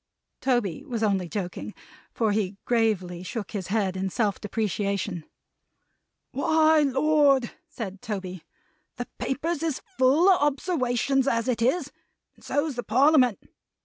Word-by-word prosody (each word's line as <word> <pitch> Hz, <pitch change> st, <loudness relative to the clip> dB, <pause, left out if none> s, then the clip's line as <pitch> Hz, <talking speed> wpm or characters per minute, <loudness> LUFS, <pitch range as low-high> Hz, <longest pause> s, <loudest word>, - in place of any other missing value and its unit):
Tony 240 Hz, -10 st, 0 dB
was 230 Hz, -3 st, -3 dB
only 195 Hz, -5 st, +1 dB
joking, 190 Hz, -3 st, -5 dB, 0.4 s
for 220 Hz, -2 st, 0 dB
he 205 Hz, -2 st, -1 dB
gravely 205 Hz, -7 st, 0 dB
shook 205 Hz, +3 st, -5 dB
his 195 Hz, -4 st, -4 dB
head 195 Hz, -2 st, 0 dB
in 190 Hz, 0 st, -2 dB
self 205 Hz, 0 st, -1 dB
depreciation. 200 Hz, -4 st, -2 dB, 1.1 s
"Why! 315 Hz, +3 st, +3 dB
Lord!" 280 Hz, -2 st, +3 dB, 0.2 s
said 200 Hz, -4 st, -7 dB
Toby. 185 Hz, -5 st, -5 dB, 0.5 s
"The 245 Hz, -, -4 dB
Papers 305 Hz, +4 st, -2 dB
is 320 Hz, -5 st, -1 dB, 0.2 s
full 275 Hz, +8 st, +5 dB
of 375 Hz, -5 st, +5 dB
obserwations 270 Hz, -3 st, +1 dB
as 230 Hz, -2 st, +1 dB
it 240 Hz, -2 st, 0 dB
is; 265 Hz, +10 st, +1 dB, 0.4 s
and -, -, -23 dB
so's 290 Hz, -1 st, -1 dB
the -, -, -1 dB
Parliament. 255 Hz, -1 st, +3 dB
235 Hz, 130 wpm, -26 LUFS, 200-275 Hz, 1.1 s, full